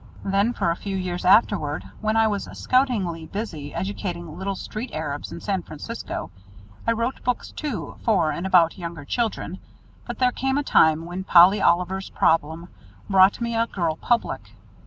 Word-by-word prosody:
Then 200 Hz, +4 st, +2 dB
for 170 Hz, -, 0 dB
a -, -, -1 dB
few 195 Hz, +1 st, -4 dB
years 180 Hz, -1 st, -3 dB
afterward, 180 Hz, -7 st, +3 dB, 0.2 s
when 215 Hz, +1 st, +1 dB
I 225 Hz, -, +5 dB
was 205 Hz, -2 st, -1 dB
"scoutingly" 205 Hz, -11 st, 0 dB
busy 165 Hz, -9 st, -5 dB
educating 175 Hz, -3 st, -4 dB
little 195 Hz, +2 st, -3 dB
street 215 Hz, +6 st, -6 dB
Arabs 145 Hz, -2 st, -4 dB
in -, -, -7 dB
San 195 Hz, -3 st, -1 dB
Francisco, 165 Hz, -, -6 dB, 0.6 s
I -, -, +4 dB
wrote 230 Hz, +3 st, -3 dB
books, 250 Hz, 0 st, -2 dB
too, 295 Hz, -7 st, -5 dB
for 185 Hz, -9 st, +2 dB
and 180 Hz, -, -3 dB
about 180 Hz, -1 st, +4 dB
younger 170 Hz, -4 st, -6 dB
children, 210 Hz, -3 st, -2 dB, 0.5 s
but -, -, -5 dB
there 250 Hz, -1 st, +3 dB
came 265 Hz, +2 st, -1 dB
a 290 Hz, -, 0 dB
time 160 Hz, -, +4 dB
when 180 Hz, +2 st, -5 dB
"Polly 185 Hz, +3 st, +6 dB
Oliver's 180 Hz, +2 st, +1 dB
Problem" 160 Hz, +2 st, +1 dB, 0.4 s
brought 190 Hz, 0 st, +5 dB
me 235 Hz, 0 st, -1 dB
a 230 Hz, 0 st, +2 dB
girl 170 Hz, -7 st, -1 dB
public. 235 Hz, +8 st, 0 dB
190 Hz, 165 wpm, -24 LUFS, 170-225 Hz, 0.6 s, Polly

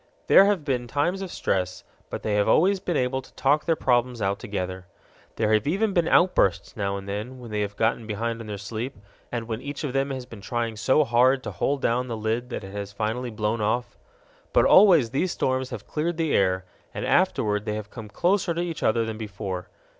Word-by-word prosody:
There 195 Hz, -, +7 dB
have 200 Hz, -7 st, +1 dB
been 125 Hz, -3 st, -1 dB
times 170 Hz, +9 st, 0 dB
of 190 Hz, -2 st, -5 dB
stress, 90 Hz, -1 st, -2 dB, 0.3 s
but -, -, -6 dB
they 110 Hz, -, -1 dB
have 105 Hz, 0 st, +2 dB
always 190 Hz, -, +4 dB
been 180 Hz, -4 st, -1 dB
able 130 Hz, +1 st, 0 dB
to -, -, -18 dB
talk 145 Hz, +3 st, +2 dB
their 165 Hz, -, +2 dB
problems 125 Hz, -3 st, +1 dB
out 100 Hz, 0 st, -1 dB
together. 95 Hz, -2 st, -5 dB, 0.5 s
There 110 Hz, -1 st, +1 dB
have 110 Hz, +2 st, +2 dB
even 200 Hz, +6 st, +1 dB
been 170 Hz, -3 st, +2 dB
outbursts 175 Hz, -, +3 dB
now 100 Hz, -3 st, -2 dB
and 100 Hz, 0 st, -8 dB
then 105 Hz, +6 st, -5 dB
when 120 Hz, -3 st, -10 dB
they 105 Hz, 0 st, -1 dB
have 100 Hz, 0 st, -3 dB
got 110 Hz, 0 st, 0 dB
behind 115 Hz, +2 st, -3 dB
on 110 Hz, -, -9 dB
their 105 Hz, -1 st, -4 dB
sleep, 110 Hz, +6 st, -5 dB, 0.3 s
and 115 Hz, -2 st, -3 dB
when 115 Hz, 0 st, -4 dB
each 145 Hz, +2 st, -6 dB
of 140 Hz, -4 st, -3 dB
them 135 Hz, +1 st, +1 dB
has 130 Hz, -2 st, -4 dB
been 115 Hz, -5 st, -11 dB
trying 115 Hz, +2 st, -2 dB
so 130 Hz, +7 st, +3 dB
hard 130 Hz, +1 st, +3 dB
to -, -, -4 dB
hold 140 Hz, -1 st, -1 dB
down 125 Hz, +2 st, +1 dB
the 115 Hz, -2 st, -4 dB
lid 110 Hz, +3 st, -2 dB
that 120 Hz, -, -5 dB
it 95 Hz, -, -8 dB
has 100 Hz, 0 st, -5 dB
finally 110 Hz, +5 st, -2 dB
blown 110 Hz, 0 st, -2 dB
off. 120 Hz, +4 st, -1 dB, 0.6 s
But -, -, +5 dB
always 175 Hz, -, +6 dB
these 170 Hz, +7 st, 0 dB
storms 130 Hz, 0 st, -1 dB
have 120 Hz, -5 st, -7 dB
cleared 160 Hz, +2 st, -2 dB
the 160 Hz, -3 st, 0 dB
air, 95 Hz, -1 st, +2 dB, 0.3 s
and -, -, -3 dB
afterward 105 Hz, -1 st, +2 dB
they 105 Hz, -1 st, -2 dB
have 105 Hz, -1 st, -6 dB
come 110 Hz, -3 st, -9 dB
closer 175 Hz, -, +1 dB
to 170 Hz, -, -1 dB
each 170 Hz, -3 st, -4 dB
other 115 Hz, +1 st, +2 dB
than 110 Hz, -1 st, -5 dB
before. 100 Hz, -4 st, -5 dB
120 Hz, 220 wpm, -25 LUFS, 105-140 Hz, 0.6 s, There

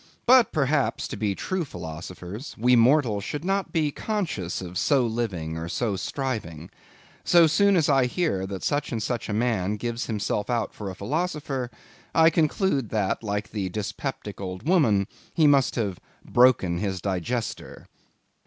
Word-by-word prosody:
But, 245 Hz, -3 st, +6 dB
perhaps, 140 Hz, -2 st, 0 dB
to -, -, -4 dB
be 105 Hz, -3 st, -1 dB
true 185 Hz, -, -2 dB
philosophers, 90 Hz, -, -8 dB
we 125 Hz, +3 st, +4 dB
mortals 120 Hz, -4 st, +3 dB
should 150 Hz, -, -5 dB
not 195 Hz, +1 st, 0 dB
be 155 Hz, -4 st, +1 dB
conscious 165 Hz, -, -3 dB
of 90 Hz, -1 st, -8 dB
so 135 Hz, -4 st, +3 dB
living 100 Hz, -9 st, -3 dB
or 80 Hz, +1 st, -5 dB
so 110 Hz, +1 st, -1 dB
striving. 95 Hz, -, -4 dB, 0.5 s
So 170 Hz, -1 st, +6 dB
soon 200 Hz, +6 st, +4 dB
as 160 Hz, -4 st, +3 dB
I 135 Hz, -3 st, +4 dB
hear 125 Hz, -, -1 dB
that 95 Hz, -1 st, -6 dB
such 145 Hz, 0 st, -1 dB
or 115 Hz, -, -1 dB
such 120 Hz, +1 st, -3 dB
a -, -, -1 dB
man 105 Hz, -3 st, 0 dB
gives 120 Hz, +2 st, -3 dB
himself 105 Hz, -1 st, -2 dB
out 120 Hz, -3 st, -1 dB
for 100 Hz, -2 st, -6 dB
a 95 Hz, -, -7 dB
philosopher, 140 Hz, -, -2 dB, 0.5 s
I 165 Hz, 0 st, +6 dB
conclude 155 Hz, -, +1 dB
that, 105 Hz, -4 st, 0 dB
like 105 Hz, -2 st, -3 dB
the 100 Hz, -3 st, -2 dB
dyspeptic 105 Hz, +2 st, -5 dB
old 95 Hz, +6 st, -6 dB
woman, 120 Hz, -, +4 dB, 0.3 s
he 160 Hz, -, +4 dB
must 140 Hz, -4 st, +4 dB
have 100 Hz, -6 st, -2 dB, 0.3 s
"broken 115 Hz, -9 st, +4 dB
his 95 Hz, -1 st, -2 dB
digester." 100 Hz, +6 st, -3 dB
120 Hz, 160 wpm, -25 LUFS, 100-150 Hz, 0.5 s, But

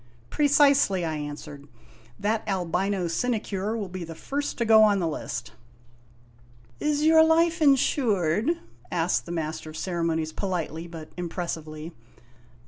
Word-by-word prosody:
" 120 Hz, -, -30 dB
" 115 Hz, -, -30 dB
Precisely," 280 Hz, -, +4 dB
I 160 Hz, -1 st, -2 dB
answered. 145 Hz, -1 st, -7 dB, 0.5 s
"That 215 Hz, +2 st, 0 dB
albino 190 Hz, 0 st, -1 dB
sinecure 215 Hz, +1 st, -1 dB
will 205 Hz, -3 st, -3 dB
be 185 Hz, 0 st, -6 dB
the 165 Hz, -1 st, -8 dB
first 285 Hz, -, -3 dB
to 235 Hz, -, 0 dB
go 220 Hz, -1 st, +7 dB
on 210 Hz, -2 st, +5 dB
the 175 Hz, -3 st, 0 dB
list." 155 Hz, -, -5 dB, 0.7 s
" 120 Hz, 0 st, -29 dB
Is 300 Hz, 0 st, 0 dB
your 320 Hz, 0 st, +7 dB
life 330 Hz, +1 st, +3 dB
insured? 225 Hz, -, +2 dB, 0.3 s
" 120 Hz, 0 st, -30 dB
asked 170 Hz, +1 st, 0 dB
the -, -, -5 dB
Master 155 Hz, -1 st, -4 dB
of 155 Hz, -, -8 dB
Ceremonies 165 Hz, -3 st, -1 dB
politely 170 Hz, -4 st, -3 dB
but 165 Hz, -2 st, -10 dB
impressively. 165 Hz, -2 st, -5 dB
175 Hz, 145 wpm, -26 LUFS, 155-225 Hz, 0.7 s, go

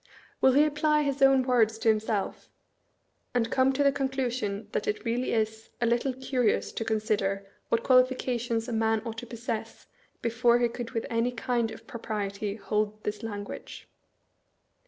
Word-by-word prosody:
Will 265 Hz, -, +6 dB
he 290 Hz, +3 st, +6 dB
apply 300 Hz, 0 st, +2 dB
his 280 Hz, -1 st, -2 dB
own 270 Hz, -1 st, +6 dB
words 230 Hz, -4 st, +3 dB
to 225 Hz, -, -3 dB
himself, 215 Hz, -2 st, -1 dB, 0.9 s
and 230 Hz, -1 st, +1 dB
come 260 Hz, 0 st, +4 dB
to 285 Hz, +2 st, +2 dB
the 280 Hz, -, +5 dB
conclusion 255 Hz, -7 st, -2 dB
that -, -, -2 dB
it 210 Hz, -, -2 dB
really 240 Hz, +2 st, 0 dB
is 220 Hz, 0 st, -1 dB
"a 240 Hz, -, +1 dB
little 240 Hz, +3 st, +1 dB
curious 255 Hz, -3 st, 0 dB
to -, -, -3 dB
consider 210 Hz, -3 st, 0 dB, 0.2 s
what 230 Hz, 0 st, +1 dB
qualifications 250 Hz, -3 st, +2 dB
a -, -, -3 dB
man 220 Hz, -1 st, +1 dB
ought 225 Hz, -1 st, -4 dB
to 240 Hz, -, -9 dB
possess, 225 Hz, -1 st, -5 dB, 0.4 s
before 235 Hz, +1 st, +3 dB
he 240 Hz, -1 st, +2 dB
could 235 Hz, 0 st, -6 dB
with 225 Hz, -, -2 dB
any 230 Hz, +2 st, +1 dB
kiad 240 Hz, -1 st, -1 dB
of 220 Hz, +1 st, -11 dB
propriety 205 Hz, -3 st, -4 dB
hold 215 Hz, 0 st, -2 dB
this 210 Hz, 0 st, -3 dB
language"? 205 Hz, -2 st, -7 dB
230 Hz, 160 wpm, -28 LUFS, 220-255 Hz, 0.9 s, Will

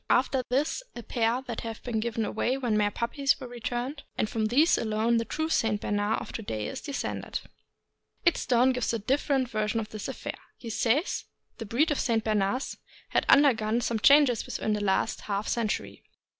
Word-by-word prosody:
After 260 Hz, 0 st, +3 dB
this 280 Hz, -, 0 dB
a 240 Hz, -, -7 dB
pair 235 Hz, +2 st, 0 dB
that 240 Hz, -4 st, -5 dB
had 225 Hz, -2 st, -6 dB
been 235 Hz, -3 st, -1 dB
given 225 Hz, 0 st, -1 dB
away 240 Hz, +5 st, 0 dB
when 245 Hz, -5 st, 0 dB
mere 210 Hz, -1 st, +3 dB
puppies 275 Hz, +7 st, 0 dB
were 260 Hz, -, -7 dB
returned, 245 Hz, +4 st, -4 dB, 0.2 s
and -, -, +1 dB
from 220 Hz, 0 st, -1 dB
these 290 Hz, +9 st, +4 dB
alone 225 Hz, +1 st, +1 dB
the 230 Hz, -, 0 dB
true 315 Hz, +8 st, -2 dB
St. 225 Hz, -9 st, +1 dB
Bernard 205 Hz, +2 st, 0 dB
of -, -, -8 dB
to -, -, -5 dB
day 110 Hz, -, -4 dB
is -, -, -5 dB
descended. 285 Hz, -2 st, -4 dB, 0.8 s
"Idstone" 260 Hz, -6 st, +3 dB
gives 250 Hz, -2 st, -1 dB
a -, -, +1 dB
different 265 Hz, +3 st, +1 dB
version 215 Hz, 0 st, -1 dB
of 215 Hz, -1 st, -5 dB
this 215 Hz, -2 st, -6 dB
affair. -, -, -6 dB, 0.2 s
He 230 Hz, -, -7 dB
says: 250 Hz, -, +1 dB, 0.3 s
The 225 Hz, -, -5 dB
breed 285 Hz, +10 st, +2 dB
of 295 Hz, -, 0 dB
St. 225 Hz, -3 st, +1 dB
Bernards 215 Hz, +4 st, 0 dB, 0.3 s
has -, -, +1 dB
undergone 235 Hz, -6 st, +5 dB
some 230 Hz, -2 st, -1 dB
changes 275 Hz, -2 st, +5 dB
within 215 Hz, -, -1 dB
the 210 Hz, 0 st, -1 dB
last 195 Hz, +3 st, +1 dB
half 200 Hz, 0 st, -2 dB
century. 225 Hz, -3 st, -2 dB
235 Hz, 185 wpm, -28 LUFS, 215-260 Hz, 0.8 s, undergone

